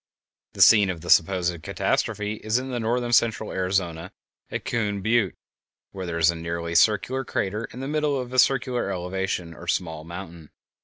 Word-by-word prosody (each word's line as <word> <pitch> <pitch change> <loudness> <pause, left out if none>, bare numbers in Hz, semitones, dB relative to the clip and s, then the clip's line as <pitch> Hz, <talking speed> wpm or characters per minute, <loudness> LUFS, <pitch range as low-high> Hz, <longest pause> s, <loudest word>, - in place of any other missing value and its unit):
The - - +5
scene 105 -4 +6
of 85 -3 -4
the 85 - -2
supposed 85 -1 +3
catastrophe 105 +6 -1
is 110 +2 +1
in 130 +1 -4
northern 120 0 -1
central 115 -2 +2
Arizona, 90 -2 -2 0.4
at - - -5
Coon 105 -4 -1
Butte, 110 -4 +2 0.6
where 95 -2 -6
there 85 -1 -3
is 85 +1 +4
a - - -7
nearly 85 0 -4
circular 105 +9 +3
crater 105 -1 -2
in 125 - -10
the 135 - -4
middle 150 -2 0
of 125 0 -6
a 130 - +2
circular 125 -5 +2
elevation 90 -2 -3
or 85 +1 -12
small 80 -3 -2
mountain. 85 -2 -9
95 Hz, 170 wpm, -25 LUFS, 85-120 Hz, 0.6 s, scene